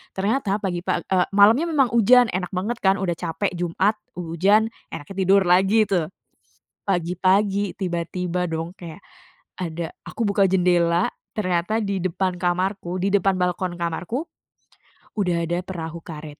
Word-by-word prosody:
Ternyata 205 +1 0
pagi 175 -2 -1
pag 175 - -2
e 180 -1 +3
malamnya 225 +11 +6
memang 270 -7 +2
hujan, 240 +1 +5
enak 180 0 -2
banget 225 +6 -2
kan 190 0 +3
udah 180 -2 -1
capek, 175 +3 -2
Jumat, 180 +5 0 0.2
ujan, 190 +6 +2 0.2
enaknya 165 +7 -8
tidur 195 0 +5
lagi 190 +5 +4
tuh. 180 -6 0 0.8
Pagi-pagi 190 +3 +1
tiba-tiba 180 0 -2
dong 165 +2 -4
kayak 175 -1 -10 0.6
ada, 170 -2 -4
aku 230 - -3
buka 200 0 +2
jendela 175 -2 +3 0.3
ternyata 205 +2 0
di 200 -1 -2
depan 185 0 -2
kamarku, 180 +1 -1
di 195 +2 0
depan 195 -1 +3
balkon 180 0 -1
kamarku, 175 - -3 1.0
udah 175 -4 +1
ada 175 +1 -1
perahu 170 -3 -6
karet. 150 -3 -9
185 Hz, 140 wpm, -23 LUFS, 175-200 Hz, 1.0 s, malamnya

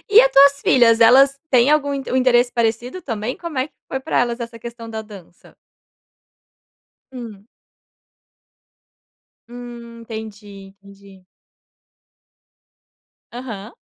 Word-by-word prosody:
e 425 +3 +8
a - - +4
tuas 280 - +5
filhas? 230 -2 +4
Elas 270 +4 +5
têm 255 +2 +4
algum 285 -2 +1
inte 270 -1 -6
um - - +1
interesse 245 -1 +3
parecido 235 +8 -2
também, 225 -2 -4
como 335 -6 -6
é 260 +4 -1
que - - -44
foi 265 - -4
pra 265 - -1
elas 240 0 -2
essa 235 0 -7
questão 235 0 -10
da 220 -1 -6
dança? 195 -5 -16 1.6
Hum. 225 -5 -10 2.0
Hum, 240 -1 -11
entendi, 205 -3 -10
entendi. 200 -1 -17 2.1
Aham. 230 -3 -8
235 Hz, 115 wpm, -19 LUFS, 220-260 Hz, 2.1 s, e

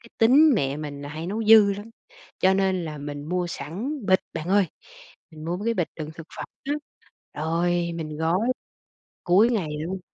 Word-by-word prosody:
cái 230 - -16
tính 275 +8 +6
mẹ 140 -8 0
mình 145 -2 -6
là 145 - -6
hay 155 +3 -6
nấu 220 +4 -2
dư 215 -2 +7
lắm, 205 +3 -8 0.5
cho 190 +1 +5
nên 190 -2 +1
là 150 -2 -6
mình 145 0 -6
mua 180 0 0
sẵn 195 - -5
bịch 185 0 +4
bạn 160 +3 -5
ơi, 200 -1 +4 0.6
mình 155 -1 -11
mua 170 +2 -1
mấy 205 - -6
cái 230 - +2
bịch 175 -6 0
đựng 155 -1 -5
thực 165 -1 -10
phẩm - - -4 0.2
á, 280 - -1 0.7
rồi 170 +1 0
mình 155 -2 -5
gói 165 +3 +2 0.9
cuối 195 +6 +5
ngày 205 -10 0
luôn. 180 +4 -4
175 Hz, 195 wpm, -25 LUFS, 155-205 Hz, 0.9 s, dư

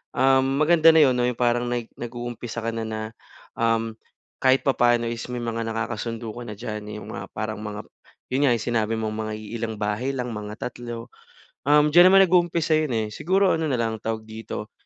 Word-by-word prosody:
ah, 135 0 +4
maganda 155 +5 +4
na 160 - +7
'yon 130 -3 +4
'no, 125 0 +2
'yong 125 - -1
parang 120 0 +1
nag 120 -1 -3
nag-uumpisa 120 -1 -6
ka 115 - -1
na, 115 0 -4
na 110 0 -4 0.6
um, 115 -1 +1 0.5
kahit 130 0 +4
papaano 120 -3 +2
is 115 0 -5
may 120 - -3
mga 115 0 -2
nakakasundo 115 0 -3
ka 120 - -8
na 105 - -5
diyan. 105 +1 -6
'Yong 105 0 -7
mga, - - -6
parang 110 0 -3
mga 105 0 -5 0.5
'yon 140 +2 +2
nga, - - +4
sinabi 115 -1 0
mong 110 -1 -3
mga 110 0 -3
iilang 110 +1 -5
bahay 105 +6 -1
lang, 125 -1 -3
mga 105 0 -7
3. 120 -1 -8 0.6
Um, 150 +1 +6
diyan 175 +3 +8
naman 195 0 +8
nag-uumpisa 170 -3 +2
yun, 155 -3 -1
eh, 110 -1 0
siguro 190 - +2
ano 160 -1 -1
na 135 - 0
lang 115 -2 -1
ang - - -42
tawag 110 0 -3
dito, 110 -1 -7
120 Hz, 200 wpm, -24 LUFS, 110-130 Hz, 0.6 s, diyan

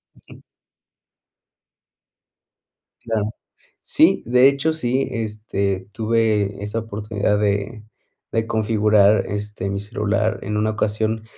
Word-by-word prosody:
Ujú. - - -17 2.6
Claro. 110 -2 -1 0.5
Sí, - - +3
de 125 +3 +6
hecho, 140 +3 +1
sí, 130 -3 0
este, 105 -4 -3
tuve 110 -3 0
esa 105 +2 -3
oportunidad 105 -1 -2
de 105 +2 -1 0.5
de 115 0 0
configurar, 105 -2 +3
este, 105 -1 -4
mi 100 - -2
celular 105 +1 -1
en 105 +1 -3
una 110 +1 +1
ocasión, 110 +1 -1
110 Hz, 100 wpm, -21 LUFS, 105-115 Hz, 2.6 s, de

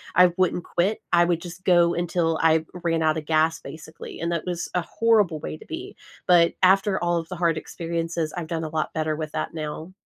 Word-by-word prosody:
I 180 0 +6
wouldn't 180 -1 +1
quit, 190 +5 0
I 175 0 +6
would 170 -1 0
just 175 +1 -9
go 175 -2 +4
until 170 -2 0
I 160 0 +4 0.2
ran 165 -1 +1
outta 155 0 +1
gas, 160 +1 +1
basically, 155 +2 -10
and 170 +1 -2
that 170 - -3
was 175 -2 -3
a 180 - +2
horrible 210 -6 +2
way 155 - -6
to - - -15
be. 365 +5 -7 0.3
But 170 -2 +5
after 195 0 +4
all 175 0 +1
of 165 -1 -4
the 185 - -5
hard 170 -2 +1
experiences, 165 0 -3
I've 175 - -3
done 165 0 -3
a - - -4
lot 155 0 -2
better 155 -1 -1
with 155 0 -5
that - - -3
now. 155 +3 -6
170 Hz, 215 wpm, -24 LUFS, 160-180 Hz, 0.3 s, I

